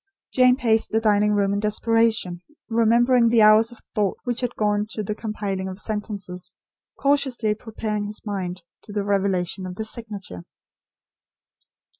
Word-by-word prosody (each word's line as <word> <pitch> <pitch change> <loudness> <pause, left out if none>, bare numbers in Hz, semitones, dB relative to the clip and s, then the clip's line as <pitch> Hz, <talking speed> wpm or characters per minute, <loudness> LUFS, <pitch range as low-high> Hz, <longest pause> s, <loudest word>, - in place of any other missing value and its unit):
Jane 255 -1 +5
paced 225 -4 +1
the 220 - +1
dining 210 -1 +3
room 200 -1 +1
in 200 - 0
desperation, 215 -4 +1 0.3
remembering 235 +1 +4
the 225 -2 +5
hours 215 +2 +6
of 240 - -15
thought 205 -4 0
which 245 -1 -2
had 245 -1 -2
gone 210 0 0
to 215 - -3
the 210 - -3
compiling 205 -3 -4
of 185 +1 -7
sentences, 195 -4 -5 0.4
cautiously 270 -6 +1
preparing 215 -1 -4
his 210 +1 -6
mind 185 -4 -4 0.2
to - - -12
the 205 -1 -1
revelation 190 -2 0
of 180 - -7
the 220 - -4
signature. 210 - -6
210 Hz, 150 wpm, -23 LUFS, 200-230 Hz, 0.4 s, hours